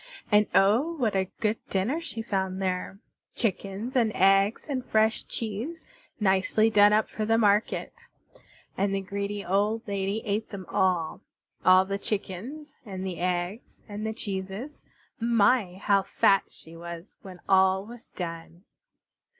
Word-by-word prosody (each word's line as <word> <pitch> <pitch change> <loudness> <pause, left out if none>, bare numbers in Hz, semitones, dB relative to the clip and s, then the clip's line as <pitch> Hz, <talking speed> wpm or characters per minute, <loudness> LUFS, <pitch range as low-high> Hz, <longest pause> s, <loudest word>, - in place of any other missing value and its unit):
And 210 0 +5
oh! 230 +12 +4
what 235 -10 -1
a 190 -1 0
good 215 0 +1
dinner 225 - 0
she 245 -9 -5
found 190 -3 -2
there; 185 0 -2 0.4
chickens 205 +2 -3
and 230 -4 +3
eggs 195 +3 +3
and 265 -4 -2
fresh 220 -1 +1
cheese 235 +10 -5 0.3
nicely 205 +2 +2
done 205 -1 +6
up 215 +1 +3
for 215 - -4
the 225 +1 +2
market. 210 0 +2 0.8
And 195 0 0
the 195 - -1
greedy 200 +1 -4
old 210 +5 0
lady 200 +2 -2
ate 210 +1 -1
them 195 -3 -7
all 180 -4 0 0.4
all 185 +1 +6
the 200 +1 -3
chickens 220 - -5
and 190 -4 -6
the 185 -3 -4
eggs 180 +4 -3
and 210 0 -6
the 220 - -1
cheeses. 200 +7 -5 0.4
My! 230 -4 +3
How 200 +1 +2
fat 195 0 +3
she 165 +1 -14
was 170 +2 -9
when 185 -2 -11
all 190 0 +4
was 240 +2 -12
done. 170 0 -7
200 Hz, 145 wpm, -27 LUFS, 190-220 Hz, 0.8 s, done